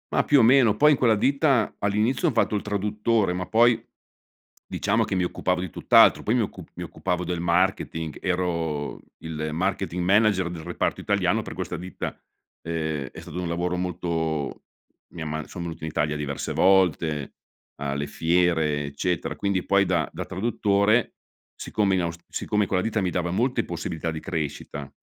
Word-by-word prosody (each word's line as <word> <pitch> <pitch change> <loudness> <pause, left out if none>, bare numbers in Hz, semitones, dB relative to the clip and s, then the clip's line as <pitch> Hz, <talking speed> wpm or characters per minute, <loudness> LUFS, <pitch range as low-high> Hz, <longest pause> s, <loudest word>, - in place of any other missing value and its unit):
Ma - - +2
più 145 - +5
o - - +6
meno. 120 -3 +5
Poi 150 +7 +5
in 145 - +3
quella 115 -4 +4
ditta, 135 0 +2
all'inizio 105 - +1
ho - - +2
fatto 110 - +2
il 105 - 0
traduttore 105 0 0
ma 90 0 -3
poi, 115 +1 +4 0.9
diciamo 110 +2 +1
che 100 - -2
mi 90 - +1
occupavo 90 0 -1
di 90 - -4
tutt'altro, - - +5
poi 110 - +1
mi 125 - +3
occupav 105 - -6
mi - - -5
occupavo 90 -1 -3
del 90 -1 -3
marketing, 85 -2 0
ero 85 -5 -2 0.2
il 80 -1 -4
marketing 90 0 -1
manager 100 -1 +3
del 85 -2 -7
reparto - - -2
italiano 100 +1 +1
per - - -7
questa 90 -2 -4
ditta. 90 +2 -6 0.4
Ehm 80 -4 -3
è - - -10
stato 90 +3 -6
un 90 - -3
lavoro 90 +1 -1
molto 80 -4 -2 0.5
mia 80 -2 -6
ma 75 0 -4
sono 85 +1 -6
venuto 80 -2 -7
in - - -3
Italia 75 0 0
diverse 70 -1 -3
volte, 85 -6 +2 0.5
alle 70 0 -2
fiere, 80 -2 +1
eccetera, 80 +4 -2
quindi 100 -2 0
poi 100 0 +3
da 90 - 0
da - - -5
traduttore, 100 +2 +1 0.4
siccome 100 -3 0
in 90 - +1
aus 85 -1 -3
siccome 105 0 -1
in - - -2
quella 90 - +1
ditta 110 -1 0
mi 95 - 0
dava 90 -1 -1
molte 120 +5 +1
possibilità 85 -1 -4
di 80 - -5
crescita, 75 -2 -5
90 Hz, 175 wpm, -25 LUFS, 80-105 Hz, 0.9 s, o